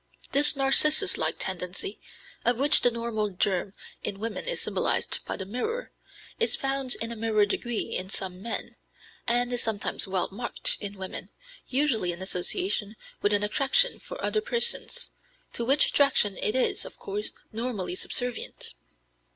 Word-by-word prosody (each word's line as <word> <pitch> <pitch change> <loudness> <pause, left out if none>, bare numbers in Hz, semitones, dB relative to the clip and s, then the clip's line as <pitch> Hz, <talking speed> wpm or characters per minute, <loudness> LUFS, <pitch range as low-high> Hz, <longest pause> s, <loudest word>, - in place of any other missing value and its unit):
This 295 +2 +7
Narcissus 305 +7 +5
like - - +1
tendency, 185 - -5 0.4
of 240 0 +2
which 280 +3 +5
the 245 - +6
normal 230 -3 -2
germ 190 0 -1 0.3
in 195 - -4
women 225 0 -4
is - - 0
symbolized - - 0
by - - -4
the 190 - -5
mirror, 440 - -4 0.5
is 465 - +3
found 270 -1 0
in 230 +1 -3
a - - -4
minor 215 -2 +2
degree 230 +2 -3
in 185 +1 -3
some 185 -2 -3
men, 230 +2 -5 0.5
and 245 +1 +1
is 245 - +1
sometimes 215 -2 -1
well 190 -2 0
marked 235 +5 -2
in 205 -1 -7
women, 190 -1 -6 0.4
usually 250 -9 +1
in 175 - -6
association 210 - 0 0.3
with 205 - +2
an 205 0 +2
attraction 275 - +2
for - - -9
other 430 - 0
persons, 475 0 +2 0.4
to 235 - -2
which 275 +5 +4
attraction 255 -8 +3
it 215 - 0
is, 260 - +1
of - - -10
course, 205 +2 -3 0.2
normally 220 -5 -3
subservient. 245 - -3
230 Hz, 155 wpm, -27 LUFS, 200-275 Hz, 0.5 s, This